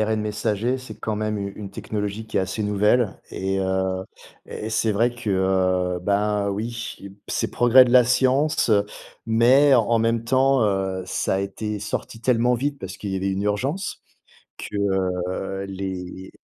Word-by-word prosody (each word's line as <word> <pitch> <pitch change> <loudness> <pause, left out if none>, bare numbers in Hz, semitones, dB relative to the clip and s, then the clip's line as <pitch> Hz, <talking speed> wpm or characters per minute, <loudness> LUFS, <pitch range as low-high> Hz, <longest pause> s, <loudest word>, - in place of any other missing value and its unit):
ARN 110 0 +1
messager, 105 +4 -1
c'est 130 - -9
quand 110 -1 -3
même 110 0 -1
u 100 -1 -4
une 100 -2 -7
technologie 105 +2 -4
qui - - -5
est 100 - +4
assez 95 +3 -3
nouvelle. 105 +2 +1
Et, 95 +1 -2
heu, 95 0 -1 0.4
et 110 +1 -6
c'est 110 0 +1
vrai 115 +4 +2
que, 95 -4 +1
bah 100 +1 +1
oui, 115 +3 -4 0.3
c'est - - -1
progrès 120 +1 +6
de 120 - -1
la 125 -1 +7
science, 130 +2 +2
heu, 100 -1 +3 0.4
mais 130 +5 +5
en 115 -1 +3
même 115 0 +1
temps, 130 +1 +3
heu, 95 -2 -1
ça 95 - -1
a - - +1
été 105 +2 -4
sorti 110 +2 -5
tellement 125 0 +2
vite, 140 +3 -2
parce 95 -4 -7
qu'il 100 - -5
y 95 - -1
avait 95 +1 -1
une 95 +1 -2
urgence 135 - -2 0.6
que, - - -6 0.5
heu, 95 +1 -4
les 95 -1 -6
105 Hz, 170 wpm, -23 LUFS, 95-120 Hz, 0.6 s, la